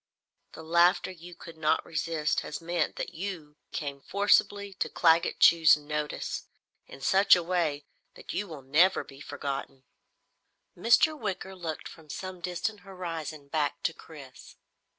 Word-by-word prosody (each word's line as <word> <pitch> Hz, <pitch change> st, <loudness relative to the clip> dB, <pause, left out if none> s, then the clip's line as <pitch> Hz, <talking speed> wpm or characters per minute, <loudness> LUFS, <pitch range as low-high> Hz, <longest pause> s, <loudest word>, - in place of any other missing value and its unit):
"The 160 Hz, -, -10 dB
laughter 170 Hz, +3 st, +3 dB
you 175 Hz, 0 st, -12 dB
could 165 Hz, -1 st, -12 dB
not 155 Hz, -1 st, +1 dB
resist 160 Hz, -2 st, -1 dB
has 150 Hz, -, -6 dB
meant 170 Hz, -1 st, -1 dB
that -, -, -5 dB
you 165 Hz, -5 st, -6 dB
came 140 Hz, -2 st, -4 dB
forcibly 200 Hz, +1 st, +2 dB
to -, -, 0 dB
Claggett 165 Hz, -1 st, +3 dB
Chew's 160 Hz, -3 st, +7 dB
notice 150 Hz, 0 st, -4 dB, 0.4 s
in 135 Hz, -, -12 dB
such 195 Hz, +8 st, +6 dB
a 175 Hz, -, -1 dB
way 165 Hz, -5 st, -1 dB, 0.3 s
that -, -, -8 dB
you 205 Hz, -, -2 dB
will 155 Hz, -6 st, -9 dB
never 160 Hz, +8 st, +4 dB
be 135 Hz, -1 st, -14 dB
forgotten." 135 Hz, -2 st, -5 dB, 0.9 s
Mr. 235 Hz, -, +4 dB
Wicker 195 Hz, -7 st, -4 dB
looked 165 Hz, -4 st, -5 dB
from 160 Hz, -2 st, -14 dB
some 185 Hz, +3 st, -6 dB
distant 180 Hz, +4 st, -3 dB
horizon 165 Hz, -6 st, -6 dB
back 145 Hz, -1 st, -1 dB
to 165 Hz, -, 0 dB
Chris. 140 Hz, -6 st, -13 dB
165 Hz, 145 wpm, -29 LUFS, 150-185 Hz, 0.9 s, Chew's